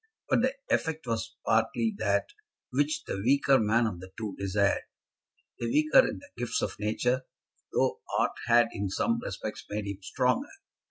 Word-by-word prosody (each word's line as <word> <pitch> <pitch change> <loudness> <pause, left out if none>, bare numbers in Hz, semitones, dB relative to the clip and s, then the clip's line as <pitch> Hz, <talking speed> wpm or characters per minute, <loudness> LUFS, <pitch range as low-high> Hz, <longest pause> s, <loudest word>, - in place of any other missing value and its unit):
But - - +4
the 260 +2 +1 0.2
effect 160 -2 0
was 115 -1 -3
partly 110 0 +2
that 100 -2 +1 0.4
which 145 +4 +1
the - - -4
weaker 135 +2 +4
man 115 +2 +3
of 105 -6 -3
the 95 +1 -11
two 110 -3 -4
desired, 100 +1 +1 0.8
the - - -2
weaker 305 - +5
in - - -4
the 285 - -14
gifts 120 -1 -1
of - - -3
nature, 125 +5 0 0.4
though - - +1 0.2
art - - +2
had 120 -1 +5
in 100 -3 -3
some 235 - +1
respects 110 - -5
made 105 0 -3
him 100 -1 -5
stronger. 125 - 0
115 Hz, 165 wpm, -29 LUFS, 105-140 Hz, 0.8 s, weaker